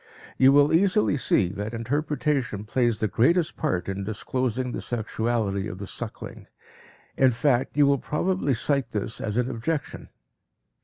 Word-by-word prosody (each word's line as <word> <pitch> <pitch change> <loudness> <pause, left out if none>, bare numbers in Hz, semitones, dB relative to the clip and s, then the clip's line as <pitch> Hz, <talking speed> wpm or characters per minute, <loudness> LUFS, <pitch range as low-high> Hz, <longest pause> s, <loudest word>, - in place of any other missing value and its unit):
You 130 +1 +6
will 145 +2 +5
easily 190 +1 +3
see 100 -8 +1
that 105 +4 -5
interpretation 135 -2 -1
plays 120 0 0
the 110 - +1
greatest 155 - +2
part 90 -1 -1
in 95 0 -3
disclosing 125 +4 -2
the - - -4
sexuality 110 -3 -2
of 95 - -7
the 100 - -6
suckling; - - -7 0.7
in 130 - +5
fact 125 +2 0
you 145 - +6
will 140 -1 +3
probably 160 -2 0
cite 140 +3 -1
this 105 +1 -3
as 105 +1 -3
an 125 0 +1
objection. 130 +5 -4
125 Hz, 150 wpm, -25 LUFS, 110-145 Hz, 0.7 s, You